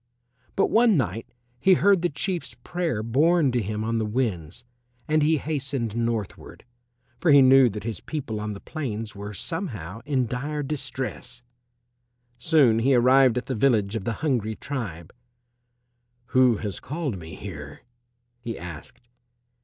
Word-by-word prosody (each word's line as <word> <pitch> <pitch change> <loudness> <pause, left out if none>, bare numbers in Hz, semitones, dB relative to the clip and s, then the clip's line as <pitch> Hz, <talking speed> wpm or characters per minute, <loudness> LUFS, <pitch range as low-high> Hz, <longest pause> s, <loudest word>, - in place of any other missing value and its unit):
But - - +2
one 225 -4 +5
night 115 - -2 0.3
he 190 +5 +5
heard 190 +5 +4
the 175 - +1
Chief's 165 -2 -4
prayer 165 -11 -2
borne 145 +5 +3
to 120 -1 0
him 105 +1 -3
on 115 +1 -1
the - - 0
winds, 105 - -2 0.4
and 155 0 +2
he 155 +2 +3
hastened 135 -7 -3
northward, 115 -4 -4 0.5
for 175 - +1
he 140 -2 +8
knew 130 -1 +7
that 105 0 -6
his 110 -4 -4
people 130 -9 -5
on 105 -1 -4
the - - -9
plains 115 -9 -5
were 100 +1 -6
somehow 115 - -4
in 135 -4 +1
dire 145 +5 -3
distress. 130 -3 -5 1.0
Soon 125 -5 +4
he 130 +3 +3
arrived 125 0 +5
at 125 - -2
the 130 - -3
village 110 -4 +2
of 105 -4 -4
the 115 - -1
hungry 110 -7 0
tribe. 100 - -6 1.2
"Who 130 -3 +5
has 105 -3 -5
called 145 - -4
me 80 -1 -9
here?" 75 -8 -9 0.6
he 115 -1 -5
asked. 90 +6 -10
120 Hz, 150 wpm, -25 LUFS, 105-145 Hz, 1.2 s, he